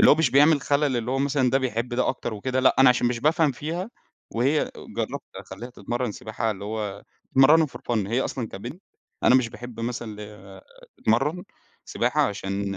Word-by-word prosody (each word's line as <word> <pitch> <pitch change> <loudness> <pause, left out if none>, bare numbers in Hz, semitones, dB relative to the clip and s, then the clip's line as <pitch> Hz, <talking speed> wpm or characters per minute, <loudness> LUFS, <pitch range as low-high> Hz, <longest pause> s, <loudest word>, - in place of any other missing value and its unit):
اللي - - +8
هو - - +8
مش 160 -5 +2
بيعمل 145 +3 +5
خلل 140 -2 +1
اللي 120 +1 -2
هو 135 - 0
مثلًا 135 -2 +1
ده 135 - +3
بيحب 120 -2 -2
ده 125 - +1
أكتر 120 -3 -3
وكده، 130 +5 -1
لأ 130 - +4
أنا 135 -1 +8
عشان 125 -1 +3
مش 120 -1 -1
بافهم 155 0 +3
فيها 170 - -4 0.4
وهي 135 +6 +1 0.3
جرّبت - - -3
أخلّيها 120 +1 -9
تتمرّن 120 -1 -3
سباحة 110 +2 -3
اللي 100 -1 -6
هو 105 -2 -4 0.3
تتمرّنها 150 +4 +6
for 135 - -11
fun 110 -5 +1
هي 120 +4 +1
أصلًا 120 -4 -3
كبنت 120 - -8 0.4
أنا - - +5
مش 130 -3 +4
باحب 120 0 -9
مثلًا 115 -2 -4
ال 100 -2 -11 0.4
تتمرّن 140 +11 0 0.4
سباحة - - +1
عشان 100 -1 -3
125 Hz, 190 wpm, -25 LUFS, 110-140 Hz, 0.4 s, اللي